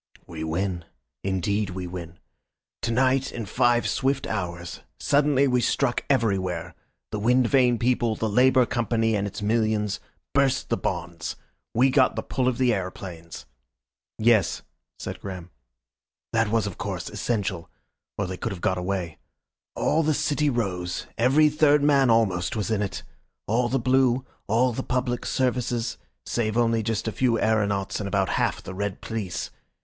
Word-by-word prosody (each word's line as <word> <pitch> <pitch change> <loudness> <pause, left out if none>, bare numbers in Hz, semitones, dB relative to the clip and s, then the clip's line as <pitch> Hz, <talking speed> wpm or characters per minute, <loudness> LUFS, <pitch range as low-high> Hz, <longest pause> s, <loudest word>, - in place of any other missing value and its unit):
"We 80 -1 -6
win. 85 +2 -2 0.4
Indeed 100 +2 0
we 90 0 -5
win. 85 -1 -7 0.6
To 120 - -1
night, 130 +2 +2
in 115 -3 -5
five 120 +2 +2
swift 135 +1 0
hours. 85 -4 -4 0.2
Suddenly 140 -1 +3
we 125 -1 +2
struck 120 +1 +1
everywhere. 95 - 0 0.4
The 105 - -2
wind 125 +4 +3
vane 125 -2 +4
people, 120 -1 +1
the 110 - -1
Labour 125 +4 +4
Company 115 -1 0
and 100 0 0
its 100 +1 -6
millions, 110 -2 +1 0.3
burst 135 -1 +2
the 115 - +2
bonds. 85 -1 -3 0.4
We 130 +3 +4
got 130 -1 +4
the - - -3
pull 130 -1 -1
of 125 -2 +1
the 125 -2 +3
aeroplanes." 90 -3 -6 0.7
"Yes," 110 -4 +3 0.3
said - - -6
Graham. 90 -3 -7 0.8
"That 115 -1 +2
was, 115 -1 +1
of 100 -4 -6
course, - - -4
essential. 100 -7 -2 0.5
Or 100 - 0
they 90 0 -5
could - - -3
have 95 - -6
got 95 +1 0
away. 90 -3 -3 0.6
All 160 - +2
the 155 -1 +1
city 150 0 +1
rose, 95 -8 -2
every 135 +6 +4
third 150 -1 +4
man 140 -3 +4
almost 100 -6 +2
was 110 0 -2
in 105 -2 +1
it! 100 - -3 0.4
All 120 +3 +1
the 135 - +1
blue, 130 0 +2 0.2
all 120 +4 +2
the 130 - -2
public 125 -1 -2
services, 125 -2 -1 0.3
save 110 -1 -1
only 115 -1 +2
just 110 0 -2
a - - 0
few 120 0 +1
aeronauts 100 -3 +1
and 105 - -3
about 100 -1 +1
half - - 0
the 95 - -7
red 100 0 -3
police. 100 -5 -4
115 Hz, 160 wpm, -25 LUFS, 95-125 Hz, 0.8 s, vane